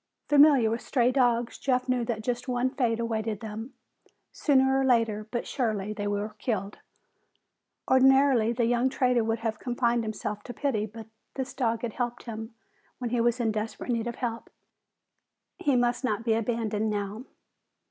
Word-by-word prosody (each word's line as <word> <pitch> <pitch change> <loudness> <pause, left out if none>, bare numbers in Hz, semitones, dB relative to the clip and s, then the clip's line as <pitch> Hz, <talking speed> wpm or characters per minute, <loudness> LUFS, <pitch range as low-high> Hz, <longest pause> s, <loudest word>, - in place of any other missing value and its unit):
Familiar 285 -6 +6
with 230 - -2
stray 250 -2 +2
dogs, 245 -3 +1
Jeff 255 -1 0
knew 255 -2 +1
that 225 -2 -3
just 245 +2 -2
one 250 0 0
fate 235 -4 0
awaited 220 -2 -2
them; 220 +3 -7 0.6
sooner 265 -2 +3
or - - +2
later, 225 -4 +2
but 240 0 -3
surely, 215 -5 -2
they 205 -1 -3
were 205 +1 -1
killed. 205 -4 -3 1.1
Ordinarily 260 -3 +5
the 235 0 +1
young 245 +2 +2
trader 250 -3 +2
would 225 0 -1
have 225 -2 -2
confined 240 -1 0
himself 210 -1 -4
to 245 - -7
pity. 220 -7 -1
But 220 +1 -10 0.3
this 265 -1 -4
dog 230 -4 -1
had 230 -3 -3
helped 240 -1 -3
him 225 0 -7 0.4
when 245 -2 -4
he 240 -1 +1
was 240 +1 +2
in 225 -2 +1
desperate 215 +3 -4
need 230 0 -1
of 235 - -4
help. 235 -2 -4 1.1
He 280 -3 +2
must 245 +1 +1
not 225 -2 -1
be 225 - +3
abandoned 220 -1 -1
now. 205 +3 -3
235 Hz, 170 wpm, -27 LUFS, 220-250 Hz, 1.1 s, Familiar